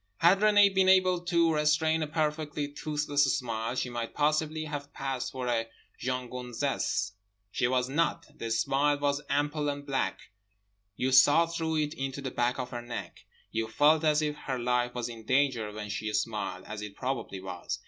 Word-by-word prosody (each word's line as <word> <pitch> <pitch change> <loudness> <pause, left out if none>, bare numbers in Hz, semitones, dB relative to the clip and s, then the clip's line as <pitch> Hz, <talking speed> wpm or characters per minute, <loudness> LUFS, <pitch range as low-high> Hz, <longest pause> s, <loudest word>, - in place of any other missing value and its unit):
Had 180 +3 +5
Renée 205 -1 +5
been 190 -1 +4
able 185 -1 +5
to 170 -2 +3
restrain 155 +1 +2
a 155 - -1
perfectly 150 -1 -1
toothless 145 0 0
smile 115 -2 -3
she 125 -1 -2
might 120 -1 -4
possibly 155 +1 +1
have 145 -1 -6
passed 135 -2 -3
for 130 -1 -4
a 115 -2 0 0.3
jeune 125 -1 -2
gonzesse. 125 -3 -2 0.4
She 120 - +1
was 125 0 +1
not. 150 +4 0
The 115 - -5
smile 135 +6 +2
was 145 0 0
ample 145 +1 0
and 145 0 -4
black. 135 -2 -2 0.6
You 130 +4 0
saw 145 +5 +7
through 165 -1 -2
it 150 0 0
into 135 -2 -4
the 135 -2 -4
back 120 +1 0
of 125 -1 -4
her 120 -1 -4
neck. 120 0 -7 0.3
You 115 0 -1
felt 150 +7 +4
as 155 0 +3
if 150 -1 -1
her 135 -3 -4
life 125 0 0
was 120 -1 -2
in 115 -2 -9
danger 130 -3 +1
when 105 0 -7
she 110 +2 -3
smiled, 105 -4 -2
as 105 0 -6
it 105 -1 -7
probably 120 -7 -3
was. 95 -2 -5
135 Hz, 180 wpm, -29 LUFS, 120-150 Hz, 0.6 s, saw